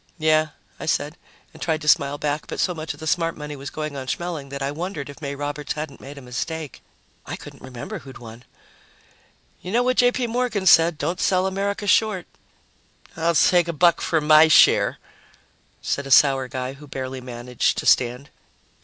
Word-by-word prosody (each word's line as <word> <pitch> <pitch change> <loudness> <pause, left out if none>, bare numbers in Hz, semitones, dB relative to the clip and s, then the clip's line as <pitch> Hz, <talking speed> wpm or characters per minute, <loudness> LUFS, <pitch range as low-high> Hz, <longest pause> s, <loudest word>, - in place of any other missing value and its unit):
"Yeah," 155 -1 +3 0.3
I - - -6
said, 150 0 -1 0.4
and - - -15
tried 160 -2 -1
to - - -7
smile 145 -2 +3
back, 150 0 -3
but - - -6
so 180 - +1
much 155 -3 -6
of - - -19
the 160 - -7
smart 165 +1 0
money 150 -1 -7
was 140 +1 -7
going 155 -2 -5
on 130 -1 -6
Schmeling 160 -2 -4
that 140 0 -5
I 140 - -1
wondered 155 -2 -5
if 145 - -16
May 140 -1 -4
Roberts 145 0 -4
hadn't 150 -3 -7
made 140 +2 -10
a 140 - -10
mistake. 145 +5 -5 0.5
I - - -4
couldn't - - -12
remember 125 -2 -7
who 135 - -13
had 130 - -11
won. 115 0 -12 1.2
"You 180 - -7
know 240 +3 +2
what 255 0 0
J. 245 0 +5
P. 250 0 -2
Morgan 235 -4 -1
said 165 -2 +6
don't 175 +3 -2
sell 185 0 +2
America 200 +2 -2
short." 205 -2 +2 0.9
"I'll 165 +1 0
take 175 +1 +4
a 170 - -2
buck 170 +2 +3
for 165 - +1
my 155 +1 +6
share," 160 - +5 0.9
said 140 -1 -2
a - - -8
sour 135 -1 +5
guy 130 0 -4
who 145 +2 -14
barely 130 -1 -5
managed 125 0 -2
to - - -3
stand. 125 +3 +2
150 Hz, 200 wpm, -23 LUFS, 140-170 Hz, 1.2 s, said